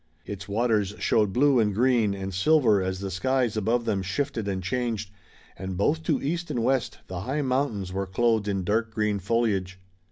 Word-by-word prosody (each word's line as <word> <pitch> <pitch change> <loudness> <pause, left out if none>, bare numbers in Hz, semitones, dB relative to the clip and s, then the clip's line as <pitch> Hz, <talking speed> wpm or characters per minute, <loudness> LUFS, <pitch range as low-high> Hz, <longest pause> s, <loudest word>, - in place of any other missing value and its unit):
Its 100 -1 -7
waters 105 -2 +1
showed 105 -3 +2
blue 135 +3 +4
and 105 -3 +1
green 115 -4 +3
and 95 0 -5
silver 110 - +4
as 95 0 -3
the 100 -1 -4
skies 120 +5 0
above 115 +3 0
them 105 -4 0
shifted 100 +3 -2
and 95 -2 -2
changed, 115 -1 -2 0.4
and 95 -1 -5
both 150 - +1
to 155 -3 0
east 170 +4 -2
and 120 - -1
west 130 -2 0
the 90 -1 -6
high 135 +9 -2
mountains 125 -8 -1
were 95 0 -2
clothed 110 +2 +1
in 95 -2 -1
dark 110 +4 0
green 105 -2 0
foliage. 95 -3 0
105 Hz, 185 wpm, -26 LUFS, 95-125 Hz, 0.4 s, blue